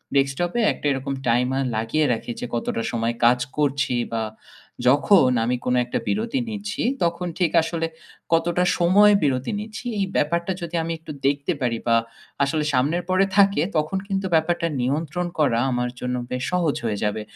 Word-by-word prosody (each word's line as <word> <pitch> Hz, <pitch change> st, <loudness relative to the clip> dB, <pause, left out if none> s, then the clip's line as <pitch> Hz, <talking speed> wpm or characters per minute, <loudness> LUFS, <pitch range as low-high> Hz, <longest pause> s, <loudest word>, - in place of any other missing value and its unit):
Desktop 140 Hz, +6 st, +1 dB
এ -, -, +3 dB
একটা -, -, -10 dB
এরকম 135 Hz, +1 st, -2 dB
timer 125 Hz, +3 st, +2 dB
লাগিয়ে 115 Hz, +8 st, +1 dB
রাখি 115 Hz, +1 st, -5 dB
যে -, -, -4 dB
কতটা 115 Hz, -1 st, -2 dB
সময় 115 Hz, 0 st, -1 dB
কাজ 125 Hz, +1 st, +5 dB, 0.2 s
করছি। 140 Hz, -3 st, +1 dB, 0.2 s
বা 115 Hz, -1 st, 0 dB, 0.6 s
যখন 145 Hz, +1 st, +5 dB
আমি 125 Hz, +2 st, +1 dB
কোনো 125 Hz, 0 st, +2 dB
একটা 120 Hz, -, -2 dB
বিরতি 225 Hz, +5 st, 0 dB
নিচ্ছি 210 Hz, -1 st, -4 dB, 0.2 s
তখন 170 Hz, +1 st, -1 dB
ঠিক 175 Hz, -3 st, +2 dB
আসলে 165 Hz, 0 st, -2 dB, 0.5 s
কতটা 170 Hz, +2 st, +2 dB
সময় 200 Hz, +4 st, +5 dB
বিরতি 130 Hz, -2 st, 0 dB
নিচ্ছি। 215 Hz, +3 st, -8 dB
এই 195 Hz, -, +2 dB
ব্যাপারটা 170 Hz, +4 st, +1 dB
যদি 170 Hz, 0 st, -5 dB
আমি 165 Hz, -, -3 dB
একটু 160 Hz, -1 st, -9 dB, 0.2 s
দেখতে 140 Hz, +5 st, 0 dB
পারি 120 Hz, -2 st, 0 dB
বা 115 Hz, -, +4 dB, 0.5 s
আসলে 150 Hz, +2 st, 0 dB
সামনের 150 Hz, +8 st, +1 dB
পরে 185 Hz, +1 st, +3 dB
থাকে 200 Hz, -5 st, +5 dB, 0.2 s
তখন 155 Hz, +5 st, 0 dB
কিন্তু 195 Hz, -1 st, -2 dB
ব্যাপারটা 170 Hz, +1 st, +1 dB
নিয়ন্ত্রণ 155 Hz, +6 st, -1 dB
করা 120 Hz, -6 st, +3 dB
আমার 125 Hz, 0 st, -1 dB
জন্য 125 Hz, 0 st, -2 dB, 0.2 s
বেশ 125 Hz, 0 st, -2 dB
সহজ 175 Hz, -5 st, +1 dB
হয়ে 105 Hz, -2 st, -1 dB
যাবে। 105 Hz, +1 st, -1 dB
150 Hz, 170 wpm, -23 LUFS, 125-175 Hz, 0.6 s, কাজ